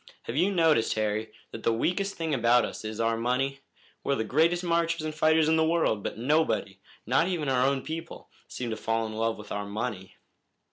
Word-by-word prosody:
Have 115 - -5
you 175 +7 +3
noticed, 160 - +3
Harry, 110 0 -1 0.2
that 115 - -7
the 115 - +2
weakest 180 - -1
thing 160 -2 -2
about 120 -1 +4
us - - -7
is 110 0 -5
our 115 0 +2
money? 130 +4 -1 0.4
We're 140 - +1
the 110 - -1
greatest 165 +9 +2
marchers 170 -1 0
and 155 0 -3
fighters 155 0 +3
in 160 0 +3
the 160 - +4
world, 160 -10 +1
but - - -5
nobody, 125 -6 0 0.3
not 135 +8 +2
even 170 -6 -2
our 130 -2 +2
own 135 -1 0
people, 165 +1 -7 0.2
seem 120 -2 -5
to 110 - -3
fall 115 +1 -1
in 110 - -6
love 115 +1 -1
with 105 - -11
our 100 0 -3
money." 100 -2 -5
130 Hz, 205 wpm, -28 LUFS, 110-160 Hz, 0.4 s, about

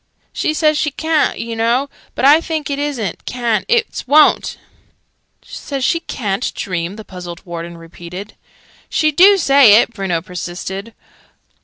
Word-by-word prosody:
"She 310 - -1
says 305 -1 +2
she 305 - +1
ca'n't, 315 +2 0
oo 230 0 -4
know. 235 +5 +1 0.3
But - - 0
I 295 +4 +7
thinks 315 -3 -3
it 280 - -2
isn't 280 -8 -3
ca'n't, 240 -3 -1
it's 465 - 0
wo'n't." 300 +3 +4 0.9
"Says 275 -2 -6
she 335 - +2
ca'n't 215 - -3
dream!" 180 -1 -3
the 220 0 -10
puzzled 175 -2 -9
Warden 170 -1 -7
repeated. 170 +4 -10 0.6
"She 310 -1 +2
do 390 +6 +6
say 275 - +6
it," 235 - 0
Bruno 190 -5 -2
persisted. 185 +4 -6
235 Hz, 145 wpm, -17 LUFS, 190-300 Hz, 0.9 s, I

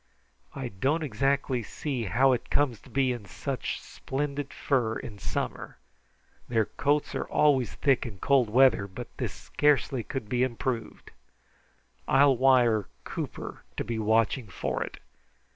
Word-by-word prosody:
"I 135 -3 -4
don't 135 - 0
exactly 135 0 0
see 125 +2 -4
how 130 +8 +4
it 125 - -1
comes 130 -7 +1
to - - -17
be 130 +1 +2
in 120 -4 -5
such 135 +2 -4
splendid 140 +1 -4
fur 120 -6 0
in 105 -2 -8
summer. - - -4 0.7
Their 115 -3 +2
coats 145 +3 0
are - - -2
always 130 - +3
thick 135 -2 +2
in 105 -4 -8
cold 130 +2 +3
weather, 125 -3 +5
but 95 - -9
this - - -2
scarcely 145 -3 +1
could 125 -1 -5
be 125 +3 0
improved. 120 -2 -2 1.0
I'll 135 0 +5
wire 120 -5 +4 0.2
Cooper - - -6
to - - 0
be 115 0 -3
watching 110 +2 +2
for 90 - -3
it. - - -9
130 Hz, 145 wpm, -28 LUFS, 115-140 Hz, 1.0 s, weather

